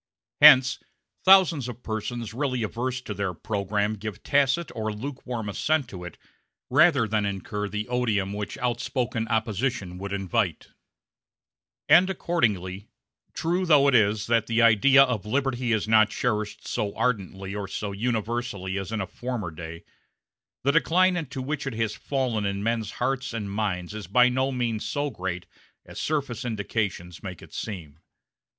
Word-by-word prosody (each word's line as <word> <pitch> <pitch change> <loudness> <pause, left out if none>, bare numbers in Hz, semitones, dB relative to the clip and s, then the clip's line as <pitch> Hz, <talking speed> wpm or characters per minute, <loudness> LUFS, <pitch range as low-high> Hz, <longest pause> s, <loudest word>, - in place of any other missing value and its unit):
Hence 135 -3 +8 0.4
thousands 185 -8 +6
of 125 0 -8
persons 110 +1 -4
really 125 -2 -1
averse 125 +3 -3
to 110 - -6
their 95 -3 -3
programme 105 +2 -1
give 105 0 -7
tacit 145 +4 +2
or 110 -1 -2
lukewarm 125 -1 -5
assent 145 +7 0
to 90 -2 -8
it 90 - -9 0.5
rather 145 -4 +5
than 110 0 0
incur 100 +1 -3
the 105 0 -3
odium 110 -6 0
which 105 0 -5
outspoken 120 -1 -2
opposition 110 -3 -1
would 100 +1 -5
invite; 100 -1 -1 1.2
and 175 +5 +6
accordingly, 105 - -1 0.5
true 175 +3 0
though 150 -5 +5
it 140 - +3
is 105 -2 +3
that 115 -2 +1
the 115 0 +1
idea 115 +5 +6
of 125 -7 -1
liberty 130 -1 0
is 110 -1 +1
not 110 -1 +5
cherished 105 -2 -2
so 100 -1 -2
ardently 100 -5 -2
or 100 -1 -4
so 100 +1 -4
universally 110 -3 -2
as 95 +2 -6
in 110 -2 -1
a - - -2
former 115 -2 -5
day, 80 +1 -8 0.8
the 140 - +3
decline 185 +5 +3
into 135 -6 -4
which 140 0 -3
it 135 - -2
has 110 -1 -1
fallen 125 -6 -2
in 100 0 -2
men's 115 -1 -1
hearts 130 0 -2
and 105 -4 -4
minds 95 -3 -2
is 105 -4 -7
by 125 +6 +5
no 130 +2 0
means 120 -4 -1
so 145 -1 -2
great 90 -4 -4 0.4
as - - -9
surface 140 -6 -2
indications 100 -6 -3
make 95 -4 -8
it - - -15
seem. 80 -8 -6
115 Hz, 155 wpm, -26 LUFS, 100-130 Hz, 1.2 s, Hence